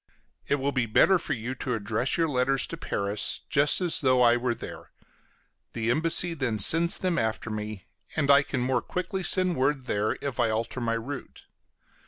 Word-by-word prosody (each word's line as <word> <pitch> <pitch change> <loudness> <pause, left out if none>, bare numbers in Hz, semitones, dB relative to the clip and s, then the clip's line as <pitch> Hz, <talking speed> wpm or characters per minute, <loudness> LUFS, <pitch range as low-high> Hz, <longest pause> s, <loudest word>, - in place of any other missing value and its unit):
It - - +2
will 140 0 -2
be 130 -3 -1
better 185 - +4
for 155 - -3
you 120 0 -5
to 125 -1 -3
address 110 +4 -2
your 165 -1 +1
letters 135 -1 0
to - - -7
Paris, 100 -9 -3
just 145 0 +4
as 175 -2 +3
though 130 -2 +3
I 120 0 +5
were 120 0 -1
there; - - -10 0.8
the 115 0 -1
embassy 165 +4 +2
then 130 -8 -2
sends 165 - +6
them 180 -2 -1
after 110 0 -3
me, 105 -2 -6 0.3
and 145 -3 +2
I 140 0 +6
can 130 -3 -4
more 125 -1 0
quickly 185 +1 -4
send 185 -1 +1
word 135 -1 0
there 105 -2 -1
if 135 -3 -5
I 120 -2 +2
alter 115 +3 -3
my 115 -1 -1
route. 130 +5 -7
130 Hz, 190 wpm, -26 LUFS, 115-150 Hz, 0.8 s, sends